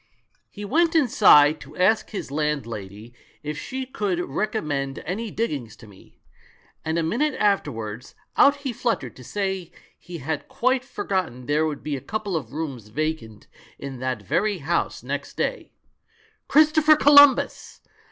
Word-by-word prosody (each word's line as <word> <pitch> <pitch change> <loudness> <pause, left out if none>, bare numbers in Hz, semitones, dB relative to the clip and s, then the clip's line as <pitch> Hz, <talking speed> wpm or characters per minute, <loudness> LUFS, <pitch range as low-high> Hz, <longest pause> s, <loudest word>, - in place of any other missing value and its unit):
He 205 0 -8
went 330 +9 +2
inside 185 - +6
to - - -13
ask 195 +5 +2
his 200 -10 -6
landlady 115 -8 -4 0.3
if 150 0 -4
she 260 - -5
could 205 -8 -2
rec 180 +6 -2
ommend 140 -9 -2
any 215 +7 -3
diggings 145 - -3
to 115 - -15
me; 100 -3 -18 0.7
and 160 +1 -1
a 165 - +1
minute 260 - 0
after 200 -8 +2
wards, 110 +1 -7 0.2
out 280 - +6
he 260 - -1
fluttered 220 - -2
to 130 - -13
say 190 - -3 0.3
he 175 -1 -9
had 150 +1 -4
quite 255 +1 0
for 260 - -6
gotten 160 -11 -2
there 150 +3 +1
would 150 -2 -5
be 150 -2 -2
a 135 - -6
couple 210 - -4
of 135 -8 -4
rooms 140 -8 -5
vacant 120 -4 -4 0.3
in 135 -2 -7
that 130 -4 -3
very 205 - 0
house 170 +2 -2
next - - -5
day. - - -2 0.8
Christopher 310 +1 +5
Colum 285 -1 +8
bus! - - -7
160 Hz, 160 wpm, -24 LUFS, 135-220 Hz, 0.8 s, Colum